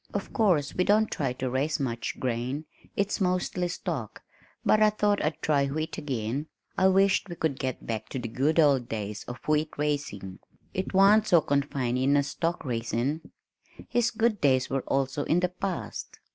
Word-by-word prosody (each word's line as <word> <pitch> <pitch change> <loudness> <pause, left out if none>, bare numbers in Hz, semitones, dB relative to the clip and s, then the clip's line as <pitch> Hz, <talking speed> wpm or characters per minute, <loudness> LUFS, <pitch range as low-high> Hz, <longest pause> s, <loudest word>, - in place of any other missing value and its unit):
Of 200 - -3
course 175 -10 +2
we 180 - +1
don't 210 +3 +3
try 135 -4 -1
to 130 +1 -3
raise 135 +5 0
much 120 -4 -3
grain 130 +4 -2 0.3
it's 200 +1 0
mostly 180 -1 0
stock, 165 - -5 0.4
but 215 - +4
I 215 - +7
thought 210 -1 +1
I'd 155 +1 -1
try 140 -2 +2
wheat 155 +3 -3
again. 130 +1 -3 0.3
I 190 - +4
wisht 195 +1 +3
we 175 - -5
could 160 -5 -1
get 130 -1 -3
back 110 -2 -4
to - - -4
the 120 -2 -3
good 140 +8 +1
old 140 -6 +4
days 105 -1 -4
of 120 - -6
wheat 155 0 +2
raising 140 -11 -3 0.3
it 190 - -2
w'ant 205 +3 +5
so 175 - +6
confining 140 -2 +1
as 140 0 +1
stock 165 -1 -2
raisin'." 120 +5 -2 0.6
His 240 -1 +2
good 225 -2 0
days 130 -3 +3
were 135 0 0
also 135 +1 0
in 170 - +3
the 180 0 +1
past! 185 0 -5
145 Hz, 175 wpm, -28 LUFS, 130-185 Hz, 0.6 s, I